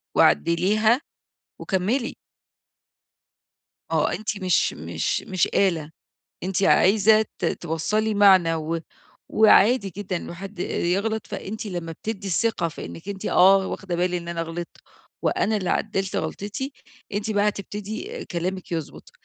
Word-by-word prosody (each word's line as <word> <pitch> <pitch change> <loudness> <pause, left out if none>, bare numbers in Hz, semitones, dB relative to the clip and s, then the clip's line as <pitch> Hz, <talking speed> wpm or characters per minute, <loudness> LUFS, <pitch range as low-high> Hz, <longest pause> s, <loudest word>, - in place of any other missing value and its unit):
وعدّليها، 215 - +3 0.6
وكملي. 215 +7 -1 1.7
ما - - +1
هو - - +3
أنتِ 210 -2 -3
مش 180 - +2
مش - - -2
مش 185 -3 0
آلة 165 -6 +1 0.5
أنتِ 190 +1 -1
عايزة 215 +3 +5
ت - - -1
توصّلي 210 +7 -1
معنى، 190 -5 +5
و 160 +1 -2 0.5
وعادي 215 0 +5
جدًا 195 -2 -3
إنه 170 - -7
حد 195 +1 -9
يغلط، 200 +7 -1
فأنتِ 220 +3 -6
لما 175 -4 -4
بتدي 200 +4 -5
الثقة 195 -1 +1
فإنك 165 +3 -8
أنتِ 200 +1 -6
آه 195 0 +5
واخدة 180 -3 -4
بالي 180 0 0
إن 170 - -8
أنا 170 -1 -3
غلطت، 165 +1 -6 0.4
وأنا 215 0 +1
اللي 185 - -3
عدلت 195 -2 -1
غلطتي؛ 205 - -4 0.4
أنتِ 215 +2 -1
بقى 205 0 +2
هتبتدي 210 - -6
كلامك 180 +1 -4
يضبط، 160 -3 -5
195 Hz, 130 wpm, -24 LUFS, 175-215 Hz, 1.7 s, عايزة